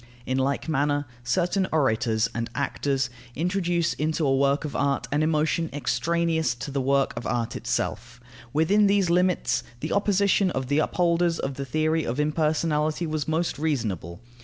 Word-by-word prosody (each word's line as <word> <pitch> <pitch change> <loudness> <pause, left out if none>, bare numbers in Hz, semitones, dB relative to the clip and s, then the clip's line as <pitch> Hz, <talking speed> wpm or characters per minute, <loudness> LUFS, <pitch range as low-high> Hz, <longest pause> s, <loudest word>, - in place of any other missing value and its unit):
In 130 +1 0
like 140 +4 -1
manner 145 -1 +1 0.2
certain 185 +8 +1
orators 115 -6 +2
and 115 0 -3
actors 135 -2 -1 0.2
introduce 175 0 0
into 155 +1 -1
a 135 -1 +3
work 140 +2 +2
of 150 - -5
art 140 -1 0
an 145 +2 +1
emotion 155 +1 +1
extraneous 160 +2 0
to 120 +4 -6
the 135 0 -1
work 135 +1 +2
of - - -5
art 120 -1 -1
itself. 120 0 -3 0.3
Within 195 - +3
these 195 -3 +2
limits, 180 +1 +2 0.2
the - - -4
opposition 200 -1 +2
of 130 -5 -3
the 145 +1 +2
upholders 170 +1 +1
of 135 - -3
the 140 +1 -5
theory 155 +4 0
of 125 +2 -3
impersonality 155 +1 0
was 155 -2 -2
most 160 -1 -1
reasonable. 110 - -2
150 Hz, 160 wpm, -25 LUFS, 135-170 Hz, 0.3 s, a